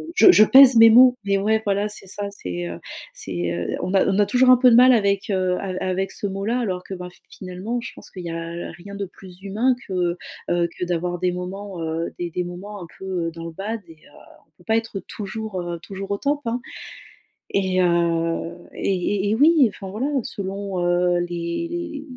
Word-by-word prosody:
je 370 0 +8
je 215 - +7
pèse 265 +1 +8
mes 225 0 +9
mots, 250 +2 +7
mais 200 0 +2
ouais, 220 +2 +1
voilà 200 0 +1
c'est 210 - -4
ça, 200 +1 -4
c'est, 90 - -5
heu, 85 0 -7 0.4
c'est, 85 -2 -2
heu, 85 0 -3
on 185 +2 -3
a 190 - +4
on 195 +1 +1
a 205 - +5
toujours 255 0 +4
un 255 - +8
peu 250 0 +6
de - - +6
mal 255 +2 +8
avec, 200 -3 +1
heu, 185 -1 +1
av 185 -2 -4
avec 190 +1 -1
ce 205 - -2
mot 195 0 -4
là. 235 +3 0
Alors 185 -6 -2
que 195 - -8
bah, 180 -1 -7 0.2
finalement 190 +6 -5
je - - -7
pense - - -12
qu'il 185 - -8
y - - -4
a 165 +1 -5
rien 180 +4 -11
de 200 0 -3
plus 185 0 -15
humain 220 +6 +1
que, 180 -2 -1 0.3
heu, 175 0 +2
que 180 - -2
d'avoir 175 0 -2
des 180 0 +1
moments, 185 +1 -6
heu, 160 +1 -3
des 175 -1 -2
des 180 - -2
moments 185 +3 -8
un - - -10
peu, 190 - -8 0.2
heu, - - -3
dans 165 0 -8
le 165 - -6
bad. 210 +6 -5
Et 165 - -12
heu, - - -21 0.4
on - - -41
peut - - -19
pas 220 +3 +2
être 225 -3 -3
toujours, 215 -1 -5
heu, 175 -1 -5
toujours 195 +2 -7
au 200 - 0
top, 285 +1 0
hein, 235 +2 -2 0.9
et 185 -2 +1
heu, 170 -1 +1 0.2
et 195 +1 -1
et 205 - +1
et - - +2
oui 295 +2 +5
enfin 195 -1 -9
voilà, 225 +8 -2
selon, 195 -2 -4
heu, 175 0 +2
les 285 - -4
195 Hz, 220 wpm, -22 LUFS, 175-220 Hz, 0.9 s, mes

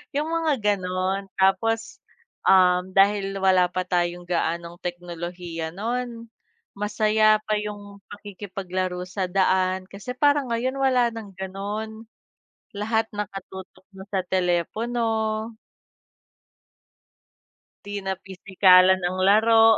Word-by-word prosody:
yung 300 +2 0
mga 330 -2 +1 0.2
gano'n. 185 +1 -2
Tapos, 225 - +1 0.4
um, 185 -1 +4
dahil 195 0 +2
wala 185 -1 +4
pa 185 - -1
tayong 175 -1 -1
gaanong 170 0 -2
teknolohiya 175 -1 -5
no'n 235 +2 -4 0.5
masaya 215 +1 +3
pa 215 - +1
yung 205 -1 -8
pakikipaglaro 185 -3 -5
sa 190 +1 -3
daan 185 0 +1
kasi 200 +5 -7
parang 285 -3 +2
ngayon 250 +3 -1
wala 255 -3 +3
ng 215 -3 -8
gano'n, 205 +3 -5 0.7
lahat 220 +2 0
nakatutok 190 -2 -7
na 190 0 -10
sa 190 -2 0
telepono. 220 +5 -1 2.3
Di 205 0 -5
na 190 - 0
pisikalan 190 0 +4
ang 180 +1 -2
laro. 225 +2 +6
195 Hz, 105 wpm, -24 LUFS, 185-220 Hz, 2.3 s, laro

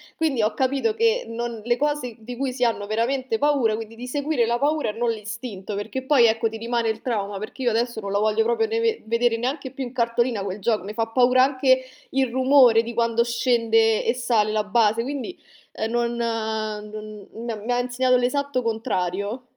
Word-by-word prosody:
quindi 295 -8 0
ho 215 - 0
capito 275 - 0
che 460 +2 +2
non 230 -1 -4
le 240 +1 +1
cose 290 -4 -1
di 240 +2 -8
cui 265 +1 -2
si 250 0 -2
hanno 225 -4 0
veramente 235 +2 -1
paura 275 -6 +2
quindi, 225 0 -7
di 245 +2 -8
seguire 285 -2 0
la 235 +1 +1
paura 295 0 0
e - - -3
non 235 +1 0
l'istinto, 220 -2 -6
perché 220 +6 -4
poi, 265 -3 +5
ecco, 225 0 +2
ti 225 - -7
rimane 230 0 -1
il 220 0 -3
trauma 205 -5 -2
perché 260 +4 -7
io 240 - +2
adesso 235 +1 -1
non 200 -2 -5
la 200 - +2
voglio 215 - +2
proprio 450 -1 +1
ne' 455 +1 -1
ve 455 -1 0
vedere 230 +1 +1
neanche 260 +3 -3
più 270 0 -5
in 245 - -6
cartolina 235 -3 0
quel 195 +1 -4
gioco. 215 -3 0
Me 210 - -6
fa 225 0 -1
paura 250 +2 +4
anche 260 -1 +3 0.3
il 265 -2 +1
rumore 255 -3 +5
di 235 - -6
quando 235 0 +2
scende 230 -2 +2
e 230 - +2
sale 230 -4 +1
la 215 -1 +1
base, 220 +1 +2
quindi, 280 +6 -5 0.4
ehm, 220 +1 -3
non 240 0 0
non 215 -2 -4
m 225 -2 -6
mi 245 - -1
ha 245 - +1
insegnato 250 +1 +1
l'esatto 255 +1 0
contrario. 215 -1 -2
235 Hz, 205 wpm, -23 LUFS, 220-260 Hz, 0.4 s, poi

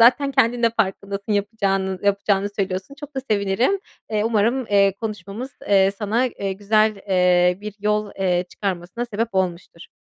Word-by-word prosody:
zaten 255 +4 +5
kendin 235 0 +2
de 230 - +5
farkındasın 200 0 -2
yapacağının 195 -2 0
yapacağını 200 0 +1
söylüyorsun. 190 +5 -3
Çok 290 0 -11
da 265 - 0
sevinirim. 210 - +1 0.3
Eee, 210 0 0
umarım, 230 +3 +1
eee, 200 -1 +4
konuşmamız, 215 +3 -5 0.2
eee, 195 -1 +5
sana, 225 +4 +1
eee, 200 -5 -3
güzel, 215 +2 +2
eee, 180 -1 +3
bir 210 -1 -7
yol, 210 0 0
eee, 180 -2 +1
çıkarmasına 190 +3 -3
sebep 230 -1 -2
olmuştur. 175 -2 -2
205 Hz, 150 wpm, -22 LUFS, 190-225 Hz, 0.3 s, zaten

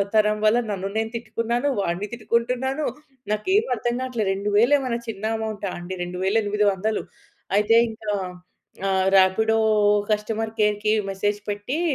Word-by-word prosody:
తరం 215 0 +4
వల్ల 215 +2 +5
నన్ను 195 -1 -3
నేను 220 0 0
తిట్టుకున్నాను. 235 +3 -1
వాడిని 195 +1 -1
తిట్టుకుంటున్నాను. 250 +5 -1 0.5
నాకేమి 375 - +1
అర్థం 240 +1 -2
కావట్లేదు. 240 -6 -1
2000 210 +7 +3
ఏమైనా 250 -3 -2
చిన్న 210 -2 -6
అమౌంటా 215 -2 -4
అండి! 175 +2 -6
2800 205 +3 0 0.5
అయితే, 210 +2 +4
ఇంకా 220 -1 -5 0.8
ఆహ్, 190 -1 +2
రాపిడో 220 +4 +4 0.5
కస్టమర్ 220 +1 -1
కేర్‌కి 210 0 +2 0.2
మెసేజ్ 205 +2 -1
పెట్టి 205 +9 -2
215 Hz, 120 wpm, -23 LUFS, 205-230 Hz, 0.8 s, వల్ల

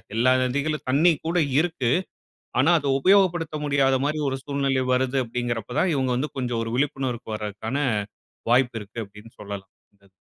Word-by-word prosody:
எல்லா 120 +3 +4
நதிகளிலும் 145 +4 -1
தண்ணீ 155 +7 +5
கூட 170 +2 0 0.2
இருக்கு. 160 -7 0 0.7
ஆனா 150 +7 +4
அத 140 - -2
உபயோகப்படுத்த 175 -3 +3
முடியாத 135 -2 +3
மாரி 155 +1 -1
ஒரு 135 - -3
சூழ்நிலை 140 -2 0
வருது 130 +1 +1
அப்டின்கிறப்ப 120 -2 -3
தான், 185 - +2
இவங்க 130 -2 0
வந்து 140 +4 -2
கொஞ்சம் 120 -3 -1
ஒரு 115 - -5
விழிப்புணர்வுக்கு 130 -5 -2
வர்றதுக்கான 105 +4 -4 0.7
வாய்ப்பு 120 -1 +3
இருக்கு 110 +3 -7
அப்டின்னு 105 +3 -15
சொல்லலாம். 100 -2 -7 0.3
அது 100 - -24
130 Hz, 150 wpm, -24 LUFS, 115-145 Hz, 0.7 s, தண்ணீ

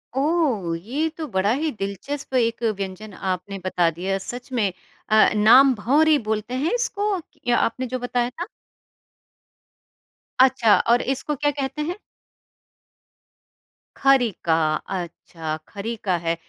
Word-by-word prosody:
ओह! 270 - +1
ये 265 - -2
तो 320 - -4
बड़ा 195 -2 +1
ही 305 +4 -1
दिलचस्प 235 +7 -5
एक 235 -1 +1
व्यंजन 195 +2 -6
आपने 190 +1 -4
बता 180 -2 +2
दिया 185 +4 -2
सच 245 +6 -8
में 220 -6 +1 0.4
अ, 215 0 +6
नाम 240 +6 +6
भँवरी 295 +9 +3
बोलते 220 +2 -2
हैं 285 - 0
इसको 425 -4 -1 0.5
आपने 255 +2 -1
जो 255 +1 -3
बताया 245 0 -1
था। 340 +8 -6 1.9
अच्छा 255 -5 +5
और 240 +1 +5
इसको 270 +3 -2
क्या 290 +2 +1
कहते 280 +1 -4
हैं? 345 +5 -3 2.0
खरीका, 245 -11 +2 0.2
अच्छा, 170 -3 -5
खरीका 210 -2 -3
है। 165 0 -1
235 Hz, 120 wpm, -23 LUFS, 195-275 Hz, 2.0 s, अ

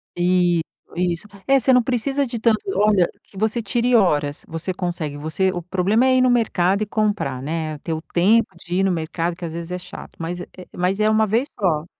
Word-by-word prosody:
Isso, 175 -1 +2 0.3
isso, 175 +1 -1 0.2
é 275 0 +5
você 260 +1 +3
não 250 -1 +5
precisa 270 +3 0
de 235 -2 -5
tanto 220 -1 +3 0.2
olha 205 -4 +4 0.2
que 195 - -17
você 220 +3 0
tire 240 +3 +1
horas, 150 -9 +2
você 165 +3 -4
consegue 170 -5 -3
você 160 +6 0
o 175 - -3
problema 190 +7 +1
é 260 0 +4
ir 255 - +4
no 255 - +4
mercado 200 -5 +2
e 215 - +1
comprar, 205 - -1
né, 155 +1 -3
ter 165 - -4
o 160 - -4
tempo 200 +8 +3 0.2
de 175 +1 -4
ir 190 - +2
no 195 - +2
mercado, 165 0 -2
que 175 - -7
às 160 - -6
vezes 170 +1 -6
é 180 - -2
chato, 180 0 -10
mas 175 +2 -4
é - - -8 0.3
mas 185 +3 0
é 215 - +3
1 220 0 +3
vez 235 +8 0
só 165 -5 +1
185 Hz, 220 wpm, -21 LUFS, 170-220 Hz, 0.3 s, é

